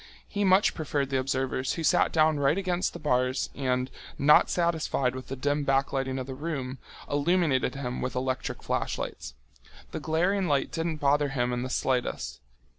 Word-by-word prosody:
He 205 - -2
much 190 +1 +4
preferred 145 -3 -2
the 135 - +2
observers 130 -1 -1
who 165 - -4
sat 175 +3 +3
down 155 -2 +3
right 140 +4 +3
against 180 -2 -1
the - - -6
bars 130 -4 0
and, 130 -1 -1 0.3
not 150 +2 +5
satisfied 160 -7 0
with 130 0 -7
the 135 - -4
dim 145 +3 0
backlighting 135 -1 0
of 130 - -4
the 135 - -6
room, 135 -3 -4 0.3
illuminated 145 -4 +1
him 125 -2 -4
with 125 -1 -3
electric 130 0 -2
flashlights. 65 +1 -3 0.6
The - - -4
glaring 180 +5 +1
light 145 -3 +1
didn't 165 0 -2
bother 145 0 +2
him 125 -2 -1
in 120 - -1
the 130 - -3
slightest. 125 - -1
140 Hz, 170 wpm, -28 LUFS, 130-160 Hz, 0.6 s, not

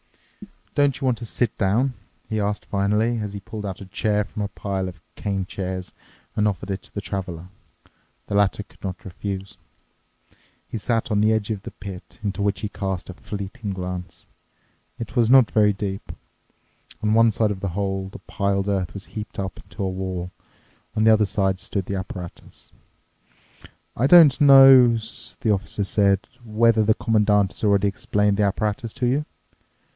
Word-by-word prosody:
"Don't 145 -2 +2
you 135 - -3
want 125 -3 +2
to 120 - -6
sit 115 0 -1
down?" 115 +7 +2 0.3
he 110 - -2
asked 105 0 -2
finally, 105 +4 +1
as 105 -2 -4
he 100 - -5
pulled 105 +1 -6
out 95 0 -6
a - - -7
chair 105 +1 0
from 105 - -7
a 100 - 0
pile 95 -2 -3
of 90 -3 -9
cane 100 -2 -2
chairs 95 -1 -5 0.4
and 105 0 +2
offered 100 -1 -3
it 95 - -3
to - - -20
the 100 - -2
Traveler. 90 -3 -5 0.8
The - - -2
latter 100 0 +2
could - - -26
not 95 -2 -5
refuse. 95 +1 -6 1.1
He - - -5
sat 115 +1 -1
on 105 - +2
the 110 +1 +4
edge 110 0 -1
of 105 -2 -4
the - - -7
pit, 95 -2 -10
into 100 -1 -2
which 100 -2 0
he 105 - -3
cast 95 -4 -4
a - - -5
fleeting 100 +3 -6
glance. 90 -1 -6 0.7
It 115 +1 -7
was 115 -3 +3
not 130 -3 +6
very 105 -1 +4
deep. 95 0 -5 0.9
On 105 0 +2
one 115 0 +5
side 110 -1 +1
of 100 - -4
the 95 - -2
hole 95 -1 -2
the - - -10
piled 100 0 -1
earth 95 -5 -1
was 100 - -7
heaped 105 -1 -7
up 95 -1 -4
into 95 +1 -7
a 95 - 0
wall; 95 -1 -4 0.6
on 110 - +2
the 110 0 +7
other 110 -1 +4
side 95 -2 0
stood 95 -1 -3
the 100 - -3
apparatus. 90 -2 -8 1.2
"I 125 - +2
don't 155 -4 +8
know," 135 -4 +8 0.4
the 110 - +2
officer 100 +1 -1
said, 100 0 +3 0.2
"whether 115 0 +3
the 110 +1 +3
Commandant 105 -3 +2
has - - -13
already 100 -1 +3
explained 105 0 0
the 105 - +2
apparatus 105 +2 -1
to 130 -1 -2
you." 135 +5 +1
100 Hz, 180 wpm, -23 LUFS, 95-110 Hz, 1.2 s, don't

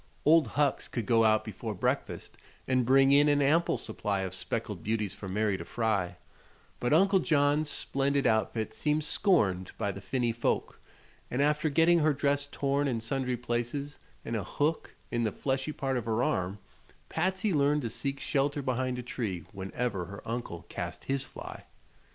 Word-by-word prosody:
Old 160 -2 +6
Hucks 145 -1 +2
could 120 -4 -3
go 115 +1 +4
out 110 0 +3
before 110 0 -5
breakfast - - -2 0.3
and 130 -2 +2
bring 135 +1 +6
in 145 +1 +6
an 145 0 +3
ample 155 +5 +3
supply 105 -3 -2
of 95 -1 -3
speckled 105 -1 -4
beauties 105 -1 -1
for 100 - -8
Mary 105 0 +1
to 85 - -6
fry; 100 -3 -1 0.6
but 120 - 0
Uncle 190 +5 +5
John's 150 -2 +2
splendid 140 0 0
outfit 110 0 +1
seemed 150 0 0
scorned 105 - +1
by 100 - -1
the 100 - -8
finny 120 +4 0
folk, 115 +1 -1 0.5
and 125 - -2
after 150 +2 +2
getting 165 +4 +4
her 155 -1 +3
dress 145 0 +1
torn 140 +1 0
in 120 -4 0
sundry 125 +2 -1
places 120 +5 -3 0.3
and 115 - -2
a 105 - -1
hook 150 - -1 0.2
in 120 - 0
the 110 - +1
fleshy 135 +6 -2
part 135 -3 -2
of 120 - -3
her 115 +1 +1
arm 90 -1 0 0.5
Patsy 185 +4 0
learned 145 0 +2
to 115 - -3
seek 140 -1 -2
shelter 145 +1 0
behind 130 -1 -1
a 125 - -5
tree 105 -8 -4
whenever 95 0 -3
her 100 +3 -10
uncle 115 -8 -4
cast 85 0 -5
his 135 0 -1
fly. - - -9
125 Hz, 175 wpm, -30 LUFS, 110-145 Hz, 0.6 s, Old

